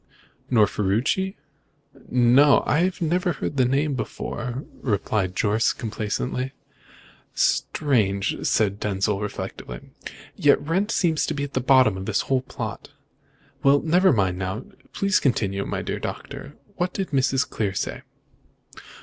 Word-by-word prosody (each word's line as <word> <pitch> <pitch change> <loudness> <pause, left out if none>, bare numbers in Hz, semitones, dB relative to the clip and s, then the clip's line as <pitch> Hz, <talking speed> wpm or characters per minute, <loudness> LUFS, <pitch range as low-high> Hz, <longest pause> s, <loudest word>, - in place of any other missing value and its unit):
"Nor 110 -4 +5
Ferruci?" 115 - 0 0.7
"No. 125 +4 +5
I 175 +5 +2
never 175 +1 +1
heard 145 - -4
the 130 - +4
name 140 +4 +1
before," 125 0 -4 0.2
replied 100 -4 -1
Jorce 110 +1 +2
complacently. 120 +4 -3 0.8
"Strange!" 105 -9 +1
said 100 -2 +1
Denzil 100 0 0
reflectively. 65 - -6 0.4
"Yet 145 - +4
Wrent 185 +8 -1
seems 165 -8 +1
to - - -2
be 140 - -2
at 145 - -6
the 130 - 0
bottom 130 -6 +4
of 95 - -6
the 105 -2 +1
whole 130 -1 +1
plot. 130 - -6 0.7
Well, 140 +1 +5
never 180 +4 +4
mind, 95 -7 +1
just 95 +5 -3
now. - - -20 0.2
Please 195 -1 +2
continue, 100 -7 0
my - - -3
dear - - -3
Doctor. - - -7 0.2
What 180 +1 -1
did 195 -4 -3
Mrs. 135 -1 +2
Clear 100 -3 -2
say?" - - -3
125 Hz, 135 wpm, -24 LUFS, 105-145 Hz, 0.8 s, Nor